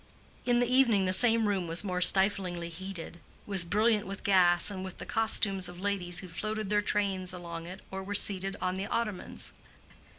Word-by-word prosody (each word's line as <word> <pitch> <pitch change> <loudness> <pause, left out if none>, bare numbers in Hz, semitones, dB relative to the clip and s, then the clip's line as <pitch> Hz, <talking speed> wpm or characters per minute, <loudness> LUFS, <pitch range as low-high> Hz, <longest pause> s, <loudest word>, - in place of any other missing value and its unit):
In 240 -1 +2
the 245 - +2
evening 240 -6 +3
the 185 - 0
same 225 +2 +4
room 190 -4 -1
was 165 +3 -3
more 180 -3 -3
stiflingly 185 -2 +4
heated, 175 0 -8 0.3
was 195 -3 +1
brilliant 210 +4 +1
with 195 0 -7
gas 180 -1 +3
and 190 -2 -6
with 190 -1 -8
the - - -8
costumes 200 -4 +1
of 175 0 -11
ladies 185 -3 -2
who 185 - -9
floated 215 +4 -5
their 210 0 +2
trains 195 -3 -2
along 170 -2 -8
it 185 +3 -10
or 190 0 -5
were 200 +2 -5
seated 195 -1 +3
on 185 0 -2
the 195 +1 -4
ottomans. 215 -5 -3
195 Hz, 190 wpm, -29 LUFS, 180-210 Hz, 0.3 s, same